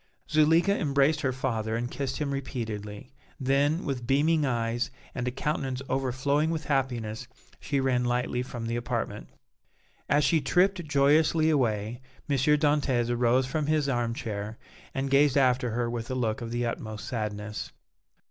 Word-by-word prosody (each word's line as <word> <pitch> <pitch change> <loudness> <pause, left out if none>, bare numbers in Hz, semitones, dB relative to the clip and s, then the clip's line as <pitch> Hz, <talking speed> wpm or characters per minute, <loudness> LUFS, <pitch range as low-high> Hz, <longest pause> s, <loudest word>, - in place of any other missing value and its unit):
Zuleika 160 +6 +4
embraced 140 -2 +2
her 130 - +1
father 115 -4 -2
and 120 +1 -3
kissed 135 -2 -3
him 145 -2 -2
repeatedly; 115 -4 -5 0.3
then, 140 +5 +1
with 125 -4 -3
beaming 150 +3 +3
eyes 120 -1 -1 0.2
and 125 0 -3
a - - 0
countenance 130 -1 -2
overflowing 135 +4 +1
with 160 -1 -2
happiness 120 -6 -1 0.3
she 140 -1 -1
ran 130 -2 +1
lightly 125 0 0
from 120 -2 -6
the 115 +1 -2
apartment. 120 - -3 0.8
As 150 - +4
she 150 +3 +3
tripped 180 +4 +2
joyously 155 +2 +3
away, 115 -4 0 0.3
M. 140 - +1
Dantès 145 -3 +2
arose 120 +2 +3
from 145 +3 -2
his 155 -2 +2
arm 120 -3 0
chair 105 0 -5 0.4
and 135 0 -2
gazed 140 0 +4
after 125 -2 +3
her 120 +1 -1
with 115 -1 -4
a 130 - -2
look 115 -3 -1
of 115 - -4
the 120 +1 -1
utmost 110 -2 -4
sadness. 105 -2 -4
130 Hz, 155 wpm, -28 LUFS, 120-145 Hz, 0.8 s, Zuleika